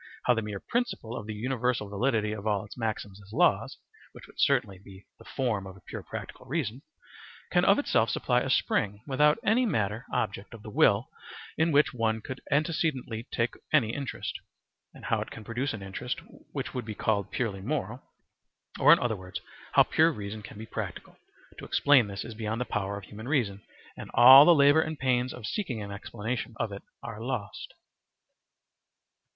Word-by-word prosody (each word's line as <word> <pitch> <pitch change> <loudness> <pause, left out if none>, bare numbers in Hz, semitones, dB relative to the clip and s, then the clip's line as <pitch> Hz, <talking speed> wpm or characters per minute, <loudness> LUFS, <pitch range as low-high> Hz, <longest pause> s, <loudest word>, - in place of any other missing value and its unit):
how 125 - +4
the 115 - -1
mere 105 -2 -5
principle 235 - -2
of 105 - -6
the 110 - -4
universal 125 -1 -1
validity 105 +1 0
of 105 0 -5
all 105 -2 0
its 100 - -11
maxims 105 -4 -4
as 100 +1 -16
laws - - +2 0.4
(which - - -12
would - - -18
certainly 95 -2 +2
be 95 0 -14
the - - -13
form 110 -8 -2
of 95 0 -11
a - - -18
pure - - -7
practical 125 - -8
reason) 135 -4 -2 0.7
can - - +3
of - - +5
itself - - +2
supply - - +1
a - - -3
spring, 105 +1 +1
without 150 +2 +3
any 225 +4 +3
matter 110 - -1
(object) 105 +1 -3
of 110 - -13
the 105 - -8
will 105 +4 +4 0.5
in 160 +1 +2
which 145 -1 +4
one 110 -2 0
could 130 +4 -7
antecedently 140 -6 -1
take 115 +1 0 0.2
any 115 -8 +3
interest; 140 -2 -4 0.5
and - - -13
how - - +1
it - - -5
can 115 - -9
produce 125 +6 -2
an 110 -3 -6
interest 95 0 -4 0.3
which - - -4
would 125 - -3
be 110 -1 -6
called 100 -2 0
purely 105 -6 -2
moral; 125 0 -3 0.8
or - - +7
in - - +9
other 120 -3 -1
words, 95 -1 -7 0.3
how - - +7
pure 160 +1 +3
reason 105 -4 -6
can 105 - -11
be 110 - -7
practical - - -6 0.4
to - - -9
explain 140 -6 +4
this 100 0 -5
is 115 - -7
beyond 110 +1 -3
the 125 - -1
power 100 -2 -2
of 100 - -9
human 110 +4 -9
reason, 115 -9 0 0.3
and - - -9
all 130 +4 +11
the 175 - +7
labour 145 +2 +6
and 155 -1 -3
pains 130 -1 +1
of 125 - -8
seeking 130 - -3
an 100 -1 -6
explanation 110 +4 -5
of 110 - -1
it 100 - -7 0.2
are 110 -2 -7
lost. 120 -4 -5
115 Hz, 190 wpm, -28 LUFS, 105-130 Hz, 0.8 s, all